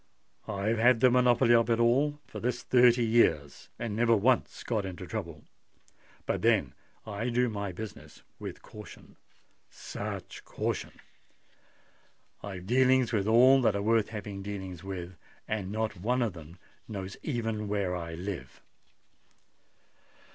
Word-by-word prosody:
"I've 105 Hz, +2 st, -1 dB
had 120 Hz, 0 st, +5 dB
the 125 Hz, +1 st, +5 dB
monopoly 125 Hz, -1 st, +4 dB
of 115 Hz, 0 st, +4 dB
it 115 Hz, 0 st, +2 dB
all 140 Hz, +5 st, +2 dB
for -, -, -8 dB
this 120 Hz, 0 st, -2 dB
thirty 120 Hz, -1 st, +5 dB
years, 80 Hz, -11 st, +1 dB
and 110 Hz, -3 st, -4 dB
never 115 Hz, 0 st, +4 dB
once 120 Hz, +4 st, +1 dB
got 110 Hz, -4 st, -1 dB
into 90 Hz, -1 st, -6 dB
trouble. 85 Hz, -2 st, -6 dB, 0.8 s
But -, -, -1 dB
then -, -, +2 dB, 0.3 s
I 110 Hz, +3 st, -3 dB
do 125 Hz, +1 st, +1 dB
my 100 Hz, -3 st, -4 dB
business 105 Hz, +3 st, -9 dB, 0.2 s
with -, -, -8 dB
caution—such 105 Hz, -1 st, -10 dB
caution! -, -, -3 dB, 1.5 s
I've 95 Hz, -3 st, -7 dB
dealings 130 Hz, +2 st, +3 dB
with 105 Hz, -2 st, +1 dB
all 130 Hz, +4 st, +6 dB
that 110 Hz, -4 st, +2 dB
are 100 Hz, -, -1 dB
worth 110 Hz, 0 st, +2 dB
having 105 Hz, -2 st, -6 dB
dealings 95 Hz, -3 st, -6 dB
with; 95 Hz, -2 st, -6 dB, 0.3 s
and 100 Hz, -3 st, -3 dB
not 110 Hz, 0 st, -2 dB
one 125 Hz, +4 st, +1 dB
of 110 Hz, -5 st, -2 dB
them 85 Hz, +1 st, -12 dB, 0.3 s
knows 100 Hz, -2 st, -6 dB
even 115 Hz, -6 st, -2 dB
where 100 Hz, -3 st, -1 dB
I 85 Hz, -2 st, -5 dB
live!" 85 Hz, -7 st, -6 dB
110 Hz, 135 wpm, -29 LUFS, 95-120 Hz, 1.5 s, all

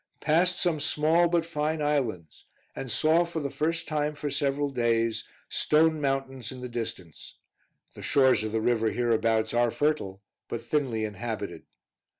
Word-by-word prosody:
Passed 175 Hz, +4 st, +2 dB
some 170 Hz, -4 st, +1 dB
small, 155 Hz, +3 st, +3 dB
but 170 Hz, -1 st, +1 dB
fine 155 Hz, -1 st, -1 dB
islands, 125 Hz, -, -2 dB, 0.3 s
and 130 Hz, -, -5 dB
saw, 160 Hz, +7 st, +3 dB
for 170 Hz, -1 st, -4 dB
the 140 Hz, -3 st, -3 dB
first 160 Hz, +4 st, -1 dB
time 150 Hz, -1 st, -1 dB
for 145 Hz, -1 st, -4 dB
several 140 Hz, 0 st, 0 dB
days, 115 Hz, -3 st, 0 dB, 0.2 s
stone 155 Hz, 0 st, +2 dB
mountains 135 Hz, -3 st, -2 dB
in 130 Hz, -1 st, -9 dB
the 125 Hz, -, -4 dB
distance: 115 Hz, -9 st, -6 dB, 0.6 s
the -, -, -11 dB
shores 130 Hz, -5 st, +3 dB
of 110 Hz, -, -3 dB
the 110 Hz, 0 st, 0 dB
river 115 Hz, -1 st, +2 dB
hereabouts 115 Hz, 0 st, +1 dB
are 120 Hz, 0 st, +3 dB
fertile, 110 Hz, -9 st, -1 dB, 0.2 s
but 115 Hz, -, -5 dB
thinly 125 Hz, -8 st, 0 dB
inhabited. 110 Hz, +2 st, -5 dB
135 Hz, 155 wpm, -27 LUFS, 115-155 Hz, 0.6 s, small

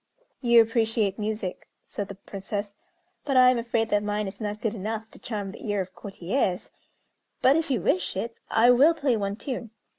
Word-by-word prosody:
"You 235 Hz, -2 st, +7 dB
appreciate 225 Hz, -3 st, 0 dB
music," 210 Hz, -3 st, -3 dB, 0.2 s
said 205 Hz, -, -5 dB
the 200 Hz, -, -8 dB
Princess; 200 Hz, +1 st, -5 dB, 0.5 s
"but 275 Hz, -2 st, +1 dB
I 255 Hz, 0 st, +8 dB
am 250 Hz, -, 0 dB
afraid 230 Hz, -1 st, 0 dB
that 205 Hz, -1 st, +2 dB
mine 210 Hz, 0 st, -1 dB
is 200 Hz, +3 st, -8 dB
not 210 Hz, 0 st, -3 dB
good 220 Hz, -2 st, -1 dB
enough 220 Hz, +1 st, -4 dB
to -, -, -14 dB
charm 205 Hz, -4 st, -4 dB
the 210 Hz, -, -11 dB
ear 205 Hz, -1 st, 0 dB
of 185 Hz, -1 st, -4 dB
courtiers; 195 Hz, 0 st, -2 dB, 0.7 s
but, 265 Hz, +2 st, +6 dB
if 325 Hz, -1 st, 0 dB
you 250 Hz, -8 st, +1 dB
wish 185 Hz, +1 st, 0 dB
it, 230 Hz, +3 st, -3 dB
I 235 Hz, +2 st, +5 dB
will 285 Hz, +7 st, +6 dB
play 280 Hz, -6 st, +1 dB
one 200 Hz, -2 st, -2 dB
tune." 240 Hz, 0 st, -5 dB
215 Hz, 190 wpm, -26 LUFS, 200-235 Hz, 0.7 s, I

